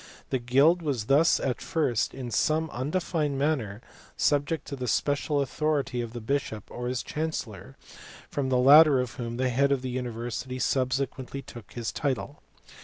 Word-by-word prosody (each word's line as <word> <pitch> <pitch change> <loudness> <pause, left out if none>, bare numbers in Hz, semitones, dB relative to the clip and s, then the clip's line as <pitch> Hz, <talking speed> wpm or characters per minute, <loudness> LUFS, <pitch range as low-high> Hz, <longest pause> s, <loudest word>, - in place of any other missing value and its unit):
The 130 - +1
guild 140 +8 +4
was 135 -9 -2
thus 145 +7 +4
at 130 -3 -2
first 130 -9 0
in 125 -3 -6
some 155 +5 +1
undefined 150 +1 -1
manner 130 -8 -1 0.3
subject 145 +1 +1
to 140 - -4
the 125 -2 -5
special 145 +4 +1
authority 140 -2 -1
of 115 -1 -6
the 120 - -5
bishop 110 -3 -2
or 120 0 -5
his 125 0 -2
chancellor, 135 - -5 0.5
from 135 -2 -2
the 130 - +2
latter 140 +2 +7
of 125 -1 -2
whom 120 -2 -4
the 130 0 +1
head 140 +3 +2
of 135 -2 +1
the 130 - -3
university 125 +1 -4
subsequently 130 +1 -1
took 120 -4 -12
his 120 -2 -3
title. 140 +1 -3
130 Hz, 165 wpm, -27 LUFS, 120-145 Hz, 0.5 s, latter